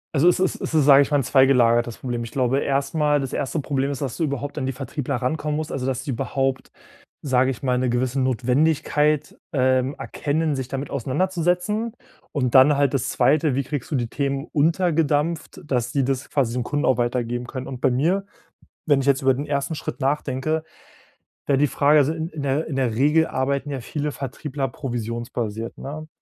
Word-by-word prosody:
also 155 +5 +5
es 180 - +2
ist 185 -1 0
es - - -4
ist, 155 -3 +4
sage 140 -1 +8
ich 140 - +1
mal, 145 - +3
'n 140 - +1
zweigelagertes 120 -3 +3
Problem. 120 -2 -3
Ich 115 - -6
glaube 130 0 +1
erstmal, 145 +2 +1
das 135 -2 -4
1. 145 +3 -2
Problem 140 -1 -1
ist, 140 - -4
dass 135 -4 -3
du - - -2
überhaupt 145 0 -3
an 130 - -2
die - - 0
Vertriebler 135 +1 -4
rankommen 150 +4 -1
musst, 155 0 -4
also 130 -1 -3
dass 130 -1 -2
sie 140 - -3
überhaupt, 135 +1 -2 0.5
sage 130 -2 +2
ich 130 -1 -5
mal, 125 -1 +1
'ne 130 0 +1
gewisse 125 +2 0
Notwendigkeit, 150 +4 +1 0.2
ähm, 130 0 +2
erkennen, 155 +1 -1
sich 130 -2 -4
damit 135 +2 -5
auseinanderzusetzen. 180 - 0 0.4
Und 125 -5 -1
dann 140 +2 +7
halt 140 -1 +2
das 135 - 0
2., 150 -1 +2
wie 140 - 0
kriegst 135 -1 -5
du - - -1
die 120 -3 0
Themen 140 +2 -2
untergedampft, 160 -1 +1
dass 125 -4 -1
die 140 0 +1
das 135 +1 -2
quasi 130 -5 0
den 125 0 -1
Kunden 145 +3 -1
auch 130 - +3
weitergeben 120 0 -1
können. 130 +1 -6
Und 130 -2 -7
bei 135 - +4
mir, 170 +10 +1 0.6
wenn 145 -3 +4
ich 135 - -3
jetzt 140 -1 +3
über 135 -1 +3
den 140 +3 -4
1. 140 +2 -1
Schritt 150 - -6
nachdenke, 145 +2 -1 0.8
wäre 140 - +3
die 145 +1 +3
Frage 145 +2 +4
also 145 +2 +2
in 160 -1 -3
in 155 -2 -6
der 140 +3 0
in 150 - -4
der 125 -4 0
Regel 150 +5 +3
arbeiten 140 +2 -1
ja 135 -2 -3
viele 150 +5 -3
Vertriebler 140 0 -4
provisionsbasiert, 115 -2 -4
ne? 155 +3 -7
135 Hz, 200 wpm, -23 LUFS, 130-150 Hz, 0.8 s, sage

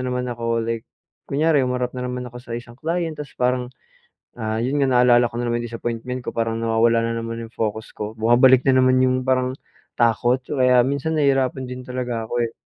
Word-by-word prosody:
na - - -2
naman 125 0 -2
ako 115 0 -1
like, 115 0 -3 0.4
kunyari 150 +1 +2
humarap 125 -1 -2
na 125 - -3
naman 125 0 -4
ako 120 +1 -10
sa 120 -1 -10
isang 120 0 -9
client 165 0 -2
ta's 145 - -8
parang, 125 0 0 0.7
ah, 110 0 -2
yun 130 +4 -1
nga 135 - +4
naalala 125 -1 +5
ko - - -12
na 120 - -1
naman 120 - 0
yung - - -4
disappointment 120 +2 -4
ko - - -2
parang 115 0 -1
nawawala 115 0 +3
na 115 - -1
naman 115 0 -5
yung 115 - -23
focus 110 0 -3
ko. 105 +1 -4
Bumabalik 125 +3 +5
na 130 -1 +5
naman 130 0 +4
yung 130 0 +2
parang 130 0 +1 0.4
takot 120 +2 +2
kaya 125 -3 +3
minsan 140 +4 -1
nahihirapan 135 -2 +1
din 125 0 -6
talaga 125 -3 -3
ako, 120 +2 -1
eh. 115 - -7
125 Hz, 210 wpm, -22 LUFS, 115-130 Hz, 0.7 s, naalala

